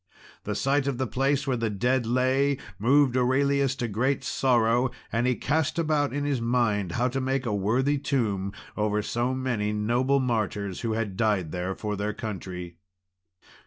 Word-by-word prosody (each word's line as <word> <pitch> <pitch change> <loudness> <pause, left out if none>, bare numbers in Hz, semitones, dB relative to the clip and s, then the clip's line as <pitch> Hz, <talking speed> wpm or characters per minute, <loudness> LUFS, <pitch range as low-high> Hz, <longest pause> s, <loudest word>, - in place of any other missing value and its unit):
The - - -2
sight 140 +1 +1
of 135 -3 -1
the 130 - 0
place 135 +5 0
where 130 -3 0
the 115 -1 -1
dead 120 +4 0
lay 130 +3 +2 0.2
moved 130 +3 +4
Aurelius 135 +1 +2
to 125 -3 -2
great 125 +6 0
sorrow, 120 -1 +2 0.2
and 115 +2 +1
he 125 - +2
cast 155 +5 0
about 155 -3 +1
in 145 +2 -2
his 140 -4 0
mind 110 -6 +1
how 125 +1 +1
to 135 +2 -2
make 130 0 -1
a 110 - -1
worthy 125 +9 +1
tomb 110 -9 -1 0.2
over 105 0 0
so 120 +4 -1
many 120 -5 -1
noble 120 +6 +1
martyrs, 105 -6 -1
who 115 -1 -1
had 110 -4 -3
died 100 -8 +1
there 90 +1 -3
for 105 -1 -3
their 105 +1 -2
country. 90 -5 -6
120 Hz, 170 wpm, -26 LUFS, 105-135 Hz, 0.2 s, moved